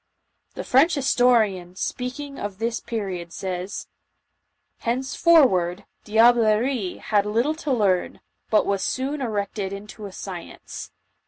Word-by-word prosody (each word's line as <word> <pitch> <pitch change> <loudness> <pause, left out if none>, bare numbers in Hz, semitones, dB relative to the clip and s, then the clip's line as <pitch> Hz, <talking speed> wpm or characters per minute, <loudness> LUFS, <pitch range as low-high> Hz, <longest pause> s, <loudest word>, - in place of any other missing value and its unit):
The - - -4
French 285 +7 +4
historian, 230 -9 +2
speaking 275 +7 -4
of 205 -2 -5
this 230 +2 -1
period, 190 -7 -4
says: 185 +2 -4 0.5
" - - -51
Henceforward, 245 - +3 0.2
diablerie 225 -1 +3
had 205 -1 +1
little 235 +8 +1
to 305 -3 -3
learn, 200 -7 +1 0.3
but 215 - +3
was 200 -1 0
soon 275 +3 -2
erected 205 -4 -2
into 205 +1 -8
a - - -10
science. 185 -2 -8
215 Hz, 115 wpm, -24 LUFS, 195-250 Hz, 0.5 s, French